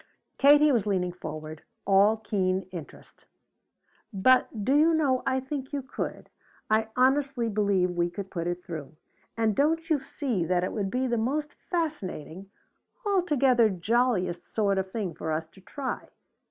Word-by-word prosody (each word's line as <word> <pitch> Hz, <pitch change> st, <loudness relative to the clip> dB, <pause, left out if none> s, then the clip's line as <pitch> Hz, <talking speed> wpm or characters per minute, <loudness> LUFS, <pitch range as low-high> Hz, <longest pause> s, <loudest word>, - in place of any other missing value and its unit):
Katie 290 Hz, +2 st, +6 dB
was 230 Hz, -6 st, +1 dB
leaning 180 Hz, -3 st, 0 dB
forward, 155 Hz, -2 st, -7 dB, 0.2 s
all 200 Hz, +3 st, +5 dB
keen 190 Hz, -3 st, -1 dB
interest. 170 Hz, -5 st, -11 dB, 0.9 s
"But 220 Hz, +1 st, +3 dB
do 270 Hz, -, +3 dB
you 320 Hz, +2 st, +5 dB
know, 275 Hz, -5 st, +2 dB
I 265 Hz, 0 st, +2 dB
think 265 Hz, 0 st, -5 dB
you 280 Hz, -2 st, -2 dB
could. 255 Hz, -, -6 dB, 0.4 s
I 220 Hz, 0 st, +3 dB
honestly 265 Hz, -1 st, +2 dB
believe 200 Hz, -4 st, +1 dB
we 175 Hz, 0 st, 0 dB
could 190 Hz, +2 st, -7 dB
put 170 Hz, -2 st, -3 dB
it 175 Hz, 0 st, -4 dB
through! 155 Hz, -4 st, -7 dB, 0.4 s
And 220 Hz, -2 st, +1 dB
don't 320 Hz, +5 st, +1 dB
you 300 Hz, -, +4 dB
see 250 Hz, -, -2 dB
that 180 Hz, +1 st, +1 dB
it 185 Hz, -, -2 dB
would 200 Hz, -3 st, -2 dB
be 255 Hz, +5 st, -1 dB
the 240 Hz, -2 st, 0 dB
most 290 Hz, +6 st, -1 dB
fascinating 195 Hz, -, -4 dB, 0.6 s
altogether 280 Hz, -, +3 dB
jolliest 195 Hz, -2 st, 0 dB
sort 200 Hz, -3 st, +1 dB
of 190 Hz, 0 st, -3 dB
thing 200 Hz, -6 st, -3 dB
for 160 Hz, -, -4 dB
us 155 Hz, +1 st, -1 dB
to 190 Hz, -, -19 dB
try? 270 Hz, +7 st, -5 dB
215 Hz, 155 wpm, -27 LUFS, 185-270 Hz, 0.9 s, Katie